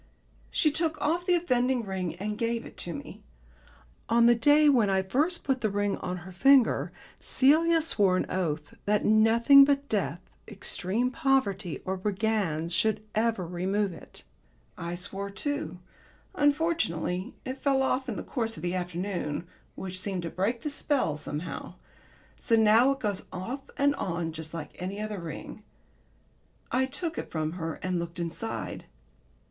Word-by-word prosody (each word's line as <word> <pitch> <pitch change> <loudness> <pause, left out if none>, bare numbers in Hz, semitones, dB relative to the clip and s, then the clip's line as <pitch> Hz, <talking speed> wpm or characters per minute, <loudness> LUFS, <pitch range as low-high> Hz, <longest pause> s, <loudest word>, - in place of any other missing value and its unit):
She 305 - +2
took 320 +1 -1
off 340 +4 0
the 360 - +5
offending 255 -7 +1
ring 190 -3 -3
and 210 +2 -3
gave 230 +1 -1
it - - -11
to 170 - -4
me. - - -9 0.9
On 235 0 +5
the 240 - +7
day 290 +6 +5
when 240 -8 +4
I 190 0 +2
first 300 - 0
put 265 -2 0
the 215 - +1
ring 205 0 0
on 180 0 -4
her 190 - -9
finger, 270 +5 +4 0.3
Celia 320 +4 +3
swore 200 - +3
an - - 0
oath 155 -5 -2
that 210 0 +1
nothing 230 +6 +7
but 280 0 +1
death, 190 -5 -2 0.2
extreme 210 +3 -1
poverty 215 - 0
or 190 +1 -2
brigands 190 -5 -1
should 215 +5 +1
ever 220 -4 +1
remove 190 +3 -1
it. 165 - -13 0.5
I 170 +1 -4
swore 195 +2 -4
too. 285 +2 -3 0.6
Unfortunately 285 - 0
it 260 +1 -5
fell 270 -2 +2
off 265 0 0
in 225 - -3
the - - -5
course 225 -4 -2
of 155 - -9
the 175 0 -1
afternoon, 180 -3 -3 0.3
which 185 -1 -5
seemed 185 -2 -3
to 165 - -4
break 225 +6 -1
the 300 - -2
spell 280 - 0
somehow. 150 +3 -5 0.6
So 230 - +2
now 220 +3 +5
it 275 0 0
goes 205 -4 -2
off 245 +10 -6
and 285 0 +3
on 170 -5 -2
just 160 0 -6
like 165 -2 -6
any 190 +3 -4
other 210 -2 -4
ring. 170 +5 -7 1.1
I 260 +1 +2
took 325 +5 -4
it - - -6
from 155 -1 -2
her 165 -2 -4
and 185 -1 0
looked 170 +1 -6
inside. 175 +6 -4
210 Hz, 160 wpm, -28 LUFS, 180-265 Hz, 1.1 s, the